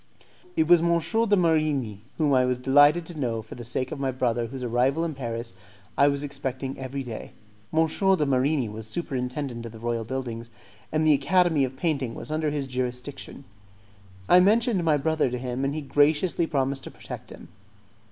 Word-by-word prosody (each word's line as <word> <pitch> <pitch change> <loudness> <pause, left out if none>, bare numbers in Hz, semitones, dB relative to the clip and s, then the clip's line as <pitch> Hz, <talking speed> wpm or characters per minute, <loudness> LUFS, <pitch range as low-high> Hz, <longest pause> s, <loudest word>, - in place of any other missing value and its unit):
It 320 - +3
was 175 -2 +7
M. 170 - +1
de 220 +4 +1
Marigni, 155 - +1 0.2
whom 150 -3 +2
I 130 -1 +5
was 125 0 +1
delighted 145 +6 +5
to 160 -2 -7
know 115 -4 -2
for - - -11
the 120 - -8
sake 125 +4 -2
of 155 - -5
my 135 -1 0
brother 120 -2 0
whose 130 +2 -7
arrival 130 +7 +1
in 165 - -3
Paris 115 -4 -5 0.4
I 140 - +5
was 140 0 0
expecting 135 -1 -4
every 135 +1 -4
day. 115 -4 -7 0.4
M. 160 +1 +3
de 190 0 +2
Marigni 135 -1 +1
was 110 +1 -7
superintendent 125 -2 -4
of - - -10
the 115 - -11
royal 115 0 -2
buildings, 120 -1 -5 0.4
and 155 0 +1
the 155 - +6
Academy 160 +1 +3
of 130 +1 -8
Painting 140 -7 -1
was - - -7
under 155 0 0
his 145 -2 -2
jurisdiction. 125 +2 -5 0.8
I 180 - +7
mentioned 215 0 +3
my 155 -3 +3
brother 155 -1 +1
to 125 - -3
him, 125 +1 -3
and 140 +2 -1
he 155 - -3
graciously 150 +4 +2
promised 135 -2 -1
to - - -6
protect - - -9
him. - - -12
135 Hz, 190 wpm, -26 LUFS, 125-155 Hz, 0.8 s, was